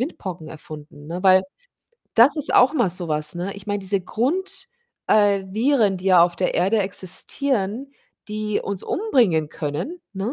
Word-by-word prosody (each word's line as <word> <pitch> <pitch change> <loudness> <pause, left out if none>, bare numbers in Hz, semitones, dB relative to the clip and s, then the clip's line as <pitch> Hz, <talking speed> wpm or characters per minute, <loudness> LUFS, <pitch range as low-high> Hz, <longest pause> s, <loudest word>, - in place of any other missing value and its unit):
Windpocken 185 - -5
erfunden, 150 -1 -11
ne? 175 +3 -5
Weil 190 -1 +6 0.7
das 245 +6 +6
ist 300 - -2
auch 255 +3 +6
mal 240 - +1
so 175 -1 -2
was, 150 0 -1
ne? 180 +3 -4
Ich 200 -1 -11
meine, 205 0 -1
diese 195 0 -1
Grund 265 - -2 0.4
äh, 205 -2 +3
Viren, 220 0 +2
die 185 +1 -8
ja 180 -3 +6
auf 175 0 +1
der 180 - -1
Erde 195 +6 +2
existieren, 210 +5 -2 0.4
die 210 0 -2
uns 200 -2 -5
umbringen 230 - +1
können, 150 - -5
ne, 200 +5 -3
195 Hz, 165 wpm, -22 LUFS, 175-235 Hz, 0.7 s, Weil